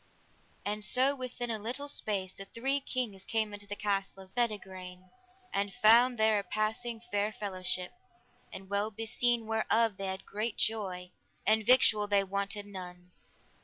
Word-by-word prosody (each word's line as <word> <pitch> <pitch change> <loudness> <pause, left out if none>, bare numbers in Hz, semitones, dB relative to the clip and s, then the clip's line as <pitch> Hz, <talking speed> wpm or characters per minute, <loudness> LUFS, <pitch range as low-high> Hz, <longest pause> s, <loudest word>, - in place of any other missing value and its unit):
And 210 +1 -2
so 260 +6 +3
within 250 -2 -4
a 220 - -2
little 250 +7 -3
space 200 -9 -2
the 195 - -8
three 270 +7 -1
kings 240 -8 -3
came 220 -1 -1
unto 205 0 -6
the 205 - -4
castle 195 -2 -2
of 185 - -20
Bedegraine, 190 -6 -3 0.4
and 200 0 -1
found 240 +2 +6
there 220 -1 +4
a - - -4
passing 220 +4 -2
fair 205 +1 +1
fellowship, 185 -3 -2 0.6
and 190 0 -8
well 200 +2 0
beseen, 225 +2 0
whereof 225 -1 +2
they 195 - -3
had 190 0 -4
great 215 +2 -3
joy, 185 -5 -1 0.3
and 215 +1 +4
victual 215 -5 +6
they 200 -1 +3
wanted 200 +1 -3
none. 180 -2 -9
210 Hz, 155 wpm, -31 LUFS, 195-230 Hz, 0.6 s, found